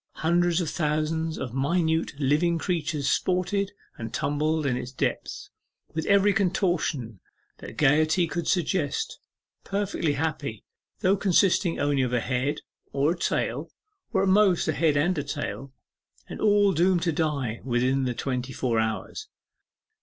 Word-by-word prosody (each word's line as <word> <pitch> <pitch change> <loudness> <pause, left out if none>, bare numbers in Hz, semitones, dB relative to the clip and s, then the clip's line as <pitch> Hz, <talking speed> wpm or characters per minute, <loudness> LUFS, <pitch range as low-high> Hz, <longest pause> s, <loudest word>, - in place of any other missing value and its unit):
Hundreds 175 +1 +2
of 170 - -2
thousands 155 +1 -1
of 120 - -5
minute 160 +2 0
living 155 +5 +2
creatures 160 -5 -2
sported 190 +4 0 0.3
and 115 -1 -5
tumbled 150 +4 0
in 130 -3 +1
its 125 0 -5
depth 130 - -3 0.4
with 160 0 -3
every 200 0 +4
contortion 175 - 0 0.4
that - - -10
gaiety 155 +4 +3
could 170 0 -4
suggest; 175 -4 0 0.4
perfectly 195 -6 -1
happy, 145 -6 -3 0.4
though 195 -1 +4
consisting 190 -2 +2
only 145 -1 +1
of 125 -1 -1
a 120 - +3
head, 130 +5 -1 0.3
or 140 +3 +2
a - - -1
tail, 175 - -1 0.4
or 195 -4 +2
at 195 - +2
most 190 -3 +4
a 155 - +1
head 150 -1 +2
and 160 +3 +1
a - - -2
tail, 140 -1 -5 0.6
and - - -8
all 205 -2 +4
doomed 175 +2 +2
to 170 - +1
die 145 -8 -1
within 130 +1 +1
the 125 -1 -2
twenty 125 0 -3
four 120 -3 0
hours. 110 0 -3
155 Hz, 145 wpm, -26 LUFS, 135-180 Hz, 0.6 s, every